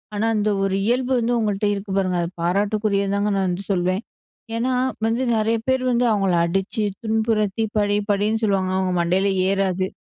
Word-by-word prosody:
ஆனா 210 +2 0
அந்த 210 0 +1
ஒரு 195 -1 0
இயல்பு 250 +2 0
வந்து 235 +1 0
உங்கள்கிட்ட 210 -2 0
இருக்கு 200 0 -5
பாருங்க 185 -2 +1
அத 170 - -1
பாராட்டுக்குரியதுதாங்க 200 +2 0
நான் 190 -1 +1
வந்து 180 +3 -3
சொல்வேன். 185 +1 0 0.5
ஏன்னா 250 +3 0 0.3
வந்து 230 +3 0
நெறைய 220 +1 +1
பேர் 260 0 +2
வந்து 245 0 +2
அவங்கள 195 -3 +1
அடிச்சு, 195 +4 -1 0.2
துன்புறுத்தி, 220 -1 0
படி 205 0 +2
படின்னு 210 +3 0
சொல்லுவாங்க. 195 -3 +1
அவங்க 185 -1 0
மண்டையில 185 +3 +1 0.2
ஏறாது. 190 -1 0
205 Hz, 160 wpm, -22 LUFS, 190-220 Hz, 0.5 s, பேர்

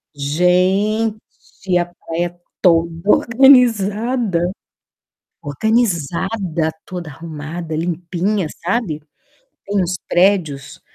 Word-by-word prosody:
Gente, 185 +6 0
a 175 - +1
praia 175 0 -5 0.2
toda 165 +1 +2
organizada. 230 -6 +3 0.9
Organizada, 175 - -1
toda 175 -4 -6
arrumada, 160 +2 -6
limpinha, 175 +3 -1 0.2
sabe? 175 -4 -1 0.6
Tem 200 0 0
uns 180 +1 -1
prédios 175 -7 +1
180 Hz, 70 wpm, -18 LUFS, 165-205 Hz, 0.9 s, organizada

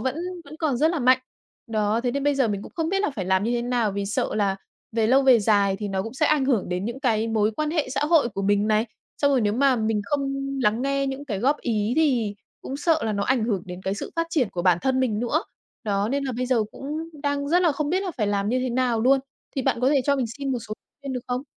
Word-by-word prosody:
vẫn 260 +4 -1 0.3
vẫn 295 +2 -11
còn 300 -6 0
rất 315 +5 +3
là 340 - -1
mạnh. 255 0 +5 0.5
Đó, 215 0 0
thế 245 0 0
nên 280 +2 -2
bây 290 - +3
giờ 265 -4 +2
mình 200 -1 -2
cũng - - -11
không 325 -1 0
biết 390 +2 0
là 410 - +1
phải 205 -9 -4
làm 190 +2 +2
như 235 - 0
thế 240 0 0
nào 240 -4 0
vì 200 0 -3
sợ 205 - -1
là 200 -2 +1 0.4
về 225 -1 +2
lâu 265 +4 +4
về 260 -3 +6
dài 200 -2 +3
thì 205 0 -4
nó 190 -1 -1
cũng 225 +5 -7
sẽ 310 - +2
ảnh 295 -3 +3
hưởng 240 -10 +1
đến 180 +1 -2
những 240 +5 -4
cái 225 -4 +1
mối 215 -1 +2
quan 305 0 -1
hệ 310 -4 0
xã 275 +1 -1
hội 305 -5 +4
của 195 -3 -5
mình 205 +1 +2
này. 215 +2 +2 0.3
Xong 285 - +3
rồi 265 -3 +3
nếu 205 -1 +1
mà 260 +2 +3
mình 220 -1 0
không 275 0 -1 0.3
lắng 220 +2 +2
nghe 275 0 0
những 270 +1 -4
cái 215 -9 -3
góp 270 +8 +2
ý 220 -2 0
thì 250 -10 +2 0.3
cũng 270 - -5
sợ 320 +1 +2
là 220 - 0
nó 200 -1 -1
ảnh 245 -2 +1
hưởng 205 -6 -1
đến 180 0 -7
cái 190 +1 -1
sự - - -6
phát 330 0 +1
triển 270 -9 +1
của 175 - -3
bản 180 -2 +4
thân 260 -1 +1
mình 220 -5 0
nữa. 265 +8 0 0.4
Đó 200 -1 0
nên 275 +3 -1
là 260 - -2
bây 255 - -1
giờ 245 -3 +2
cũng 270 - -9 0.4
đang 285 0 -1
rất 350 +4 +3
là 335 -4 +4
không 290 +1 -2
biết 370 +3 +1
là 380 - -3
phải 215 -5 0
làm 200 0 0
như 250 +3 +1
thế 255 0 -1
nào 240 -2 +1
luôn. 270 +3 +4 0.4
Thì 270 - 0
bạn 235 - 0
có 255 - +3
thể 285 -2 +4
cho 280 -1 +2
mình 260 -3 0
xin 275 -1 -2
một 250 - -1
số 215 - -3 0.3
khuyên 275 -1 -5
được 250 - -3
không? 250 +1 -2
245 Hz, 290 wpm, -24 LUFS, 210-280 Hz, 0.5 s, về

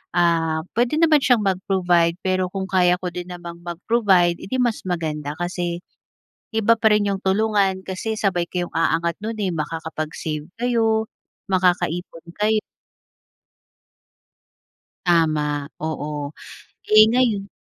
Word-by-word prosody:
Ah, 165 -2 +2 0.2
pwede 245 +4 +2
naman 315 -1 +5
siyang 245 -5 +3
mag-provide 180 -3 +1
pero 185 -1 +1
kung 190 0 -5
kaya 180 -2 +4
ko 180 - -2
din 180 0 -6
namang 175 -1 -8
mag-provide, 175 0 +1
edi 260 - -5
mas 245 -3 +1
maganda 150 -4 -3
kasi, 175 0 -3 0.7
iba 225 +1 +3
pa 220 - 0
rin 205 -1 +1
yung 195 - -1
tulungan 195 -1 +1
kasi 190 +4 -4
sabay 190 -5 0
kayong 175 0 -3
aangat 165 +1 0
nun 220 +2 -4
eh, 190 - 0
makakapag-save 155 -1 -4
kayo, 225 -2 +1 0.4
makakaipon 175 -2 0 0.2
kay 215 +1 +2 2.4
Tama. 150 -4 +1
oo. 150 -2 -4 0.6
Eh, 215 0 +8
ngayon 220 -6 +1
180 Hz, 120 wpm, -22 LUFS, 165-210 Hz, 2.4 s, Eh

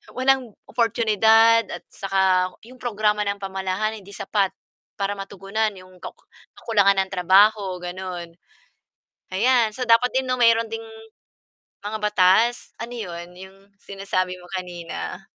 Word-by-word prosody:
walang 260 -2 +1 0.2
oportunidad 225 0 +4
at - - -7
saka 190 -2 +1
'yong 255 +1 -15
programa 210 -3 0
ng 200 0 -2
pamahalaan 195 +3 -2
hindi 200 +1 -14
sapat 200 -3 0 0.5
para 200 +1 0
matugunan 200 +2 -3
'yong 185 0 -15
kaku - - -10 0.3
kakulangan 200 -3 +3
ng - - -26
trabaho 190 +1 +4
gano'n, 175 -2 -6 1.0
ayan. 235 +2 +3
So 250 - -2
dapat 235 +2 +4
din 260 0 +1
no 255 0 0
meron 230 -1 +4
ding 225 0 -5 1.0
mga 215 +1 -3
batas 210 +4 +3
Ano 235 +1 -6
yun, 175 -6 -7
yung 190 +1 -12 0.2
sinasabi 185 -2 -3
mo 180 - -15
kanina? 175 -2 -6
200 Hz, 130 wpm, -23 LUFS, 185-225 Hz, 1.0 s, oportunidad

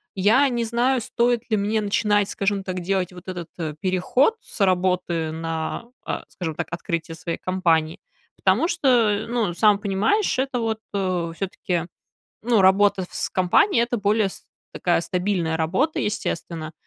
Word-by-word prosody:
я 225 +9 +4
не 240 -1 -1
знаю, 240 +2 +1
стоит 240 +1 0
ли 215 - +3
мне 215 +2 0
начинать, 205 0 +1
скажем 200 0 -1
так, 185 -1 -4
делать 185 0 -1
вот 180 +1 -13
этот, 175 -3 -6
э, 155 -2 -3
переход 190 - +2
с - - -11
работы 180 -3 0
на, 165 +5 -3 0.2
а, - - -3
скажем 160 -4 -5
так, - - -3
открытие 165 -1 -3
своей 165 +1 -4
компании. 165 -4 0 0.4
Потому 210 - +2
что, 330 -6 -1
э, 220 -4 +3
ну, 230 -7 0
сам 210 +2 +4
понимаешь, 210 - +1
это 265 -2 -1
вот, 225 -1 -1
э, 185 -4 -1
всё-таки, 180 -2 -3 0.6
ну, 230 -3 +3
работа 190 0 +4
в - - -23
с - - -1
компанией 230 - +3
это 240 +1 -1
более 205 0 +2
с - - -11 0.3
такая 175 -2 +1
стабильная 180 -2 -1
работа, 190 - 0
естественно, 165 -6 -3
195 Hz, 160 wpm, -23 LUFS, 175-225 Hz, 0.6 s, я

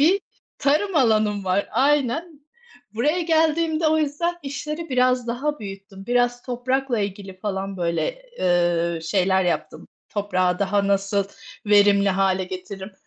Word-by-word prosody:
bir 365 +7 +4 0.4
tarım 310 +6 +1
alanım 215 -5 +2
var, 190 +2 0
aynen. 290 +5 +1 0.5
Buraya 300 +10 +1
geldiğimde 320 -1 +2
o 315 - +2
yüzden 315 +4 -1
işleri 300 +4 -5
biraz 255 -1 +2
daha 290 +5 -2
büyüttüm, 195 -1 -9
biraz 245 0 +1
toprakla 255 0 -1
ilgili 195 -1 -5
falan, 195 -1 -3
böyle, 180 - -2 0.2
eee, 175 -2 +1
şeyler 190 +2 +2
yaptım. 175 - -3 0.2
Toprağı 185 -3 0
daha 200 0 +1
nasıl 200 0 +1 0.4
verimli 205 -1 +5
hâle 190 0 +1
getiririm? 190 +2 -8
210 Hz, 125 wpm, -23 LUFS, 195-290 Hz, 0.5 s, verimli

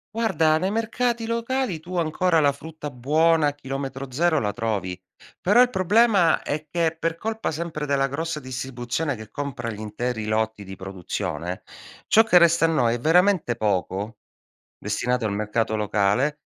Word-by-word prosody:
Guarda, 165 -9 +2
nei 185 +4 -1
mercati 230 +1 -1
locali 230 -4 -1
tu 180 +3 -8
ancora 165 +1 +2
la 145 -1 +4
frutta 150 +1 -8
buona 155 +5 +3
a 145 - -1
chilometro 135 -1 -5
zero 160 +3 +2
la 105 - 0
trovi. 100 -5 -3 0.4
Però 205 +6 +5
il 250 - +5
problema 205 -2 +3
è 155 +1 -4
che, 165 0 0
per 165 0 -1
colpa 220 +5 -3
sempre 160 -1 -4
della 140 -1 +1
grossa 155 +2 -3
distribuzione 130 +2 -3
che 110 -1 -10
compra 140 -4 -4
gli 105 - -8
interi 110 +1 -3
lotti 110 -1 -1
di 95 0 -8
produzione, 90 -2 -5 0.4
ciò 225 - +6
che 200 -5 +5
resta 170 -1 +4
a - - +4
noi 120 -8 +2
è 120 - -5
veramente 175 -3 +3
poco, 105 0 -2 0.6
destinato 120 +4 -1
al 105 - 0
mercato 105 +2 -1
locale, 105 +8 +1
145 Hz, 160 wpm, -24 LUFS, 110-170 Hz, 0.6 s, ciò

